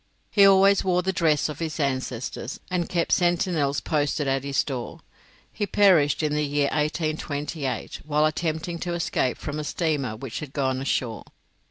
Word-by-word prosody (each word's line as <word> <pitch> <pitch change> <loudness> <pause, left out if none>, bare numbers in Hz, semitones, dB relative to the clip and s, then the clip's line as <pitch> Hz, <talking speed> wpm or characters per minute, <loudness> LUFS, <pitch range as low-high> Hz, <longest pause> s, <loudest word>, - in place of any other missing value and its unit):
He 200 -2 +7
always 195 0 +5
wore 180 -1 +1
the 190 +1 0
dress 155 -4 +2
of 150 -2 -7
his 160 -1 -4
ancestors, 130 -2 -3
and 175 -2 -1
kept 170 -2 0
sentinels 175 -5 +1
posted 145 -1 0
at 135 0 0
his 140 -1 +1
doors. 130 -4 -6 0.5
He 205 - -2
perished 180 -8 +4
in 150 -1 0
the 150 - +1
year 145 -1 +1
1828, 150 -2 -2
while 150 0 +2
attempting 160 +2 -2
to 175 0 -3
escape 145 -6 0
from 150 0 -5
a - - -3
steamer 150 -7 -1
which 120 +1 -6
had 145 -3 -8
gone 130 -2 0
ashore. 125 -4 -2
150 Hz, 165 wpm, -25 LUFS, 140-170 Hz, 0.5 s, He